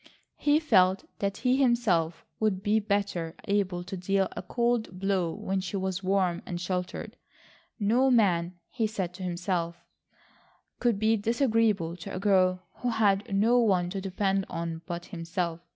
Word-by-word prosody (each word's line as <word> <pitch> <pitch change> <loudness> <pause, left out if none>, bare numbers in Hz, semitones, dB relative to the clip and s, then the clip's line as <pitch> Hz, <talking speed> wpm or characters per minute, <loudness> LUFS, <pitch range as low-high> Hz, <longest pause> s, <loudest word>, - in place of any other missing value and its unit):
He 295 +1 +4
felt 190 - +3 0.2
that 200 0 -1
he 255 +1 +4
himself 220 -11 +2
would 200 -3 0
be 215 +1 +3
better 200 -5 -1
able 195 -3 0
to 185 - -6
deal 190 +1 +1
a - - -6
cold 235 -6 -1
blow 190 -3 0
when 195 0 -2
she 185 +2 -4
was 190 -1 -2
warm 185 -2 +1
and 175 -1 -5
sheltered. 180 0 -4 0.6
No 235 +6 +3
man, 185 -7 +3 0.2
he 225 -3 0
said 190 -5 -3
to 185 - -11
himself, 175 -1 -2 0.9
could 240 -4 +2
be 220 +2 +2
disagreeable 220 -6 +1
to 195 +3 -7
a - - -3
girl 185 -2 +3
who 245 - -1
had 205 -3 +2
no 230 +5 +4
one 185 -6 +2
to 195 0 -3
depend 195 0 0
on 165 -1 -4
but 175 -1 -5
himself. 170 -1 -3
195 Hz, 155 wpm, -28 LUFS, 180-215 Hz, 0.9 s, He